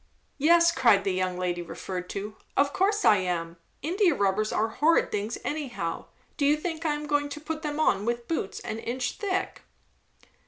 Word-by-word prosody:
"Yes," 335 +3 +5
cried 235 -10 +4
the 195 -2 0
young 185 -1 -1
lady 180 -1 -1
referred 180 +1 -6
to; 210 +2 -5 0.2
"of 280 0 +3
course 410 +2 +1
I 210 - +7
am! 175 -2 -2 0.3
India 350 +1 +2
rubbers 200 +1 +1
are 220 +1 +1
horrid 315 +8 +2
things 210 +3 -2
anyhow; 240 - -3 0.3
do 285 - +1
you 295 +1 +4
think 325 0 -4
I 300 - +1
am 300 0 -5
going 290 -1 0
to 290 - -6
put 315 +1 -5
them 300 -1 -3
on 200 -10 +2
with 235 +1 -2
boots 320 -12 -2
an 220 - -5
inch 250 +2 -2
thick?" 385 -2 -2
250 Hz, 185 wpm, -27 LUFS, 195-310 Hz, 0.3 s, I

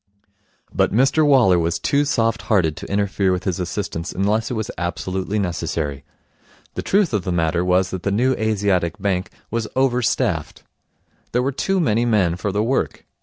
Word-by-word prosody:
But - - +2
Mr 135 +7 +3
Waller 125 - +5
was 85 0 0
too 145 +1 +1
soft 115 -6 +1
hearted 90 -8 +2
to - - -8
interfere 100 -1 +1
with 90 0 -1
his 95 -2 -2
assistants 90 -1 -3
unless 105 +4 0
it 125 - -3
was 110 +2 -3
absolutely 95 +3 -3
necessary. 80 -6 -2 0.7
The - - -3
truth 195 - +1
of 105 -4 0
the 90 - -2
matter 85 0 +1
was 90 +1 +2
that 95 - -4
the 100 - -1
New 125 +6 +2
Asiatic 100 -6 0
Bank 95 -1 -1 0.2
was 115 -1 -1
over 130 -1 +2
staffed. 115 - -1 0.7
There 125 +1 +2
were 135 - 0
too 190 +8 0
many 115 -8 +2
men 100 -8 +2
for 95 +3 -3
the 105 +2 0
work. 130 +4 -1
100 Hz, 175 wpm, -21 LUFS, 90-120 Hz, 0.7 s, Waller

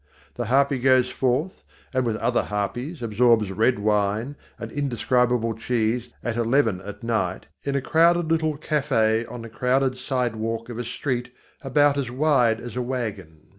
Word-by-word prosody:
The - - -4
harpy 135 +3 +2
goes 130 0 +3
forth, 135 +9 -1 0.3
and 130 -2 +1
with 110 - 0
other 120 +2 +1
harpies 120 - -3
absorbs 115 -2 +3
red 115 +5 +2
wine 105 +5 0 0.2
and - - -7
indescribable 125 -4 +1
cheese 115 +1 -1
at 120 -1 -2
eleven 115 -5 +2
at 105 +3 -9
night 110 -6 -1 0.2
in 140 -1 -2
a 140 - +1
crowded 170 +3 +3
little 160 -2 +1
café 125 -7 +1
on 120 -1 -7
the 115 - -8
crowded 130 +3 +1
sidewalk 115 -3 -2
of 120 -1 -6
a - - -2
street 120 0 -3 0.3
about 145 +1 +3
as 130 -4 -2
wide 125 -4 +2
as 120 +1 -8
a 125 - -1
wagon. 105 -11 -5
125 Hz, 160 wpm, -24 LUFS, 115-135 Hz, 0.3 s, goes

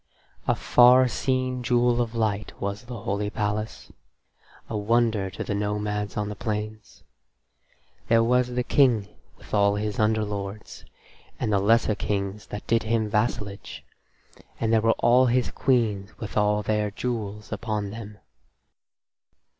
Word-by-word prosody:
A - - +3
far 125 +1 +6
seen 130 0 -1
jewel 120 0 +2
of 120 -1 -3
light 105 -2 -2
was 100 +3 -4
the 120 -3 -7
holy 105 -2 -2
palace, 105 +1 -3 0.8
a 110 - -5
wonder 110 -2 +1
to 90 - -6
the - - -3
nomads 105 0 -2
on 105 0 -1
the 105 - -5
plains. 110 +1 -5 1.0
There 115 0 +4
was 125 +1 +3
the 125 0 -2
King 120 -7 +3 0.3
with - - -17
all 100 -1 +3
his 105 0 -3
underlords, 105 -1 -2 0.5
and 105 - -1
the 100 - +3
lesser 110 +2 +3
kings 105 -1 -3
that 105 - -7
did 115 0 +2
him 110 -1 -1
vassalage, 105 -2 -2 0.8
and 115 0 +1
there 110 - +4
were 115 - +2
all 125 +2 +4
his 120 -4 +1
queens 110 -7 0
with 110 - -7
all 105 0 +2
their 105 0 0
jewels 105 -2 -4
upon 105 -3 -3
them. 105 -1 -9
110 Hz, 140 wpm, -25 LUFS, 105-120 Hz, 1.0 s, far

